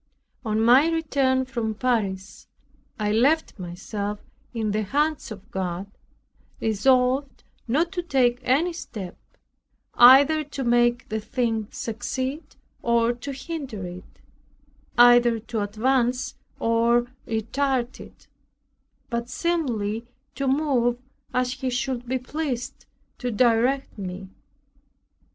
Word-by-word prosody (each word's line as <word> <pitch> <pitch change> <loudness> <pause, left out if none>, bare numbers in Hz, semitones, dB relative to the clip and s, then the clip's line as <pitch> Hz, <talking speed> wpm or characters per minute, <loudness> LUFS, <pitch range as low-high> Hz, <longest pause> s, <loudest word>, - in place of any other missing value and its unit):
On 215 -2 0
my 250 +8 +6
return 275 -5 +1
from 235 -4 -3
Paris, 205 -6 -2 0.5
I 210 -1 0
left 270 +3 +2
myself 200 +4 -5 0.3
in 220 -3 -2
the 215 +1 0
hands 290 +5 0
of 210 +2 -10
God, 190 0 -4 0.7
resolved 255 +5 +1 0.2
not 315 +9 +1
to 365 -2 -2
take 255 -7 +2
any 285 +8 +1
step, 210 - -7 0.8
either 280 +5 +7
to 275 -2 -6
make 240 0 +2
the 220 0 -1
thing 225 -1 -1
succeed 260 +5 -4 0.4
or 235 0 +2
to 245 +4 -7
hinder 270 - -6
it, 180 +1 -11 0.8
either 240 -1 +6
to 225 0 -4
advance 245 +4 0 0.3
or 235 +1 +3 0.2
retard 245 +3 -1
it, - - -14 0.9
but 235 0 -2
singly 240 -9 -1 0.3
to 275 0 -2
move 260 -4 +2 0.3
as 250 0 0
He 260 0 -3
should 245 0 -2
be 260 +2 0
pleased 255 -1 -4 0.3
to 250 - -2
direct 245 +2 +1
me. 185 0 -6
240 Hz, 110 wpm, -24 LUFS, 220-265 Hz, 0.9 s, either